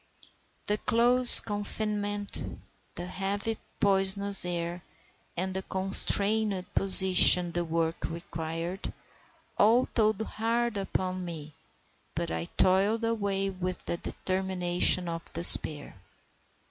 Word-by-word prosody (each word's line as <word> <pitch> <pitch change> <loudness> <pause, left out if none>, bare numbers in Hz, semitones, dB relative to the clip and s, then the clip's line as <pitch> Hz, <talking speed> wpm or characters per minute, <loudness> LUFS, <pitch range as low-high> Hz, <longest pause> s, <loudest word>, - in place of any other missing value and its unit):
The 210 0 -4
close 245 +2 +7
confinement, 205 -1 -7 0.4
the 175 - -9
heavy, 200 +4 -6 0.2
poisonous 200 0 +2
air, 175 0 -7 0.6
and 185 +2 -6
the 190 - -6
constrained 195 +1 0
position 185 -2 +6
the 175 0 -4
work 165 0 -5
required, 165 +2 -9 0.7
all 230 +4 +1
told 215 -3 -3
hard 230 +1 -5
upon 185 -1 -6
me; 155 -4 -11 0.6
but - - -6
I 80 0 -6
toiled 195 - -2
away 200 -4 -4
with 185 -1 -8
the 170 - -6
determination 185 -1 -2
of 165 0 -9
despair. 155 - +4
190 Hz, 100 wpm, -25 LUFS, 175-205 Hz, 0.7 s, close